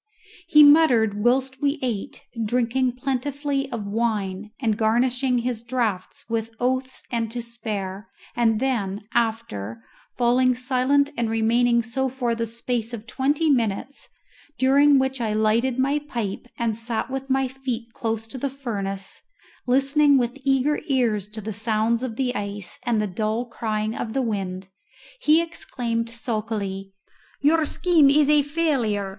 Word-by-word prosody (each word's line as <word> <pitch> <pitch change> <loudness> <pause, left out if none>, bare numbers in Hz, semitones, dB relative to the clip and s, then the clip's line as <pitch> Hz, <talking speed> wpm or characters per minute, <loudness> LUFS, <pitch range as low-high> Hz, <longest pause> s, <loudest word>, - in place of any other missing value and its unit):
He 300 -3 +8
muttered 245 -9 +5
whilst 260 +2 +1
we 285 +1 +1
ate, 230 -6 -3 0.2
drinking 245 +3 +1
plentifully 275 +2 -2
of 225 -4 -4
wine, 210 -2 -2
and 225 -5 +1
garnishing 245 +4 +1
his 240 -1 -2
draughts 235 -6 -2
with 225 -1 -2
oaths 260 +1 -1
and 230 -2 -1
to 240 +2 -5
spare; 215 -4 -5 0.3
and 225 -2 +2
then, 210 -6 -1
after 165 - -2 0.3
falling 250 +1 +3
silent 260 +3 +2
and 235 -1 -1
remaining 235 +2 +2
so 265 +4 -1
for 245 -2 -1
the 230 0 -2
space 235 0 -3
of 220 -1 -10
twenty 285 +6 +1
minutes, 235 +1 -1 0.5
during 275 +3 +5
which 265 -1 0
I 220 -2 0
lighted 225 +4 +2
my 275 +3 +2
pipe 235 -7 -5
and 230 -2 0
sat 230 +2 -3
with 270 0 -4
my 265 0 +2
feet 250 -3 -5
close 225 -4 -3
to 260 - -6
the 280 - -1
furnace, 200 -8 -4 0.5
listening 275 +3 +4
with 245 +2 -1
eager 275 +2 +2
ears 230 -7 +1
to 215 +1 -6
the 215 +1 -5
sounds 220 +2 +1
of 250 -4 -4
the 250 0 -1
ice 205 -3 -5
and 235 -3 +2
the 210 - +1
dull 215 +4 -2
crying 220 -2 -2
of 220 - -4
the 270 - 0
wind, 195 -4 -3 0.5
he 325 -7 +4
exclaimed 235 -8 -3
sulkily, 215 -4 -3 0.5
"Your 310 +2 +4
scheme 320 -2 +4
is 295 +1 +4
a 300 -1 +6
failure. 275 -10 0
240 Hz, 150 wpm, -24 LUFS, 220-265 Hz, 0.5 s, He